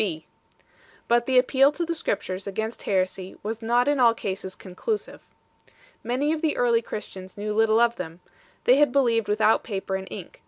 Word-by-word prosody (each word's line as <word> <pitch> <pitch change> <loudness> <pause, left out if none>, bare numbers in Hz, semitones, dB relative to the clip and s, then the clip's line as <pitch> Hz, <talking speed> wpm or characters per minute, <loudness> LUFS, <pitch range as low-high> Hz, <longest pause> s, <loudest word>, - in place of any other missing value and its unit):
B. 165 -7 -3 0.8
But 235 0 +2
the 260 -1 +3
appeal 265 +2 +5
to 340 +3 -2
the 335 - -2
Scriptures 195 - -3
against 220 +3 -4
heresy 185 -1 -1
was 220 +2 -4
not 240 +3 +2
in 290 -1 +2
all 235 -2 +5
cases 190 -3 -5
conclusive. 305 - -5 0.8
Many 260 +6 0
of 315 - -3
the 315 -3 0
early 235 -2 +3
Christians 190 -4 -8
knew 210 +1 -3
little 220 +1 +3
of 235 0 +3
them; 165 -1 -7 0.4
they 255 - +5
had 290 -2 +4
believed 235 -5 +2
without 215 +1 +3
paper 195 -3 -3
and 190 0 -5
ink 185 -4 -9
7 - - -31
225 Hz, 185 wpm, -25 LUFS, 195-250 Hz, 0.8 s, appeal